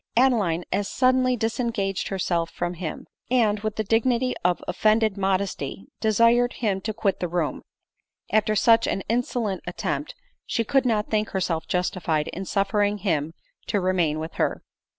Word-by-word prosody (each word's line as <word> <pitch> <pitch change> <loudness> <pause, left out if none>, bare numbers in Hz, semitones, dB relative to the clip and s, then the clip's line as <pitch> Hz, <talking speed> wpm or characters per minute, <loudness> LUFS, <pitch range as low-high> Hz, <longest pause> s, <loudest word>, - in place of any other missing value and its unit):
Adeline 210 -10 +3
as 200 +1 0
suddenly 255 -1 +2
disengaged 220 -4 -1
herself 175 -3 -1
from 175 0 -3
him, 170 -2 -6 0.2
and, 225 -4 +3
with 215 0 -3
the 220 - -1
dignity 235 +4 +1
of 180 0 +1
offended 215 +3 +2
modesty, 195 0 -2
desired 230 +3 +3
him 200 -5 -1
to 220 - -2
quit 210 -2 -1
the 180 - -1
room, 170 -3 -2 0.7
as - - +6
after 215 0 -1
such 230 +1 +4
an 195 - -1
insolent 230 -4 -1
attempt, - - -3 0.3
she 230 - 0
could 265 +3 +2
not 215 -3 0
think 215 0 +1
herself 165 -4 -2
justified 170 -4 -1
in 190 +2 -5
suffering 205 +1 +1
him 165 -5 -1 0.3
to 205 - +1
remain 180 -5 +1
with 160 +1 -5
her. - - 0
205 Hz, 155 wpm, -25 LUFS, 180-230 Hz, 0.7 s, as